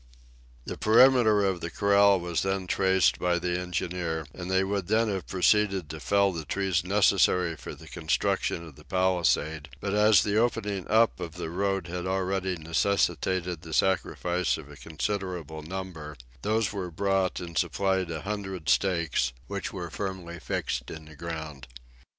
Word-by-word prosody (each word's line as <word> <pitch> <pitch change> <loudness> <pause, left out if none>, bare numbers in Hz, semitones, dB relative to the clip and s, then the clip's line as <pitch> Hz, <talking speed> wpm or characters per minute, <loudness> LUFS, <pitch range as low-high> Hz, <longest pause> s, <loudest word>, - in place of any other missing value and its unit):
The - - -6
perimeter 110 -2 +5
of 95 -3 -1
the 85 - -3
corral 100 0 +4
was 85 -1 -2
then 95 -1 -1
traced 95 0 +2
by 90 -1 +1
the 90 +1 -1
engineer, 85 -2 -3
and 90 0 -7
they 95 0 +3
would 100 -2 -2
then 110 +1 +2
have 95 -3 -3
proceeded 95 -3 +2
to 80 - -7
fell 100 +4 +2
the 85 -3 -5
trees 95 +1 0
necessary 90 -3 +3
for 75 - -8
the 80 +3 -14
construction 85 0 -1
of 80 -4 -13
the 75 - -15
palisade, 85 -4 0
but 100 +4 -3
as 105 0 +5
the 105 -1 0
opening 105 -5 0
up 110 -1 +3
of 85 -3 -5
the 85 -1 -5
road 95 0 -1
had 90 +1 -4
already 95 0 -1
necessitated 85 0 0
the 80 -1 -9
sacrifice 90 -2 +1
of 75 -2 -11
a - - -11
considerable 85 -1 -4
number, 80 -3 -7 0.2
those 110 - 0
were 95 -3 -4
brought 95 +1 0
and 85 -2 -8
supplied 95 -2 0
a 80 -2 -5
hundred 95 -5 -4
stakes, 85 -10 +1
which 100 -1 -4
were 90 -4 -6
firmly 95 -3 -5
fixed - - -3
in 80 -1 -8
the 80 0 -14
ground. 80 -4 -6
90 Hz, 160 wpm, -27 LUFS, 85-100 Hz, 0.2 s, perimeter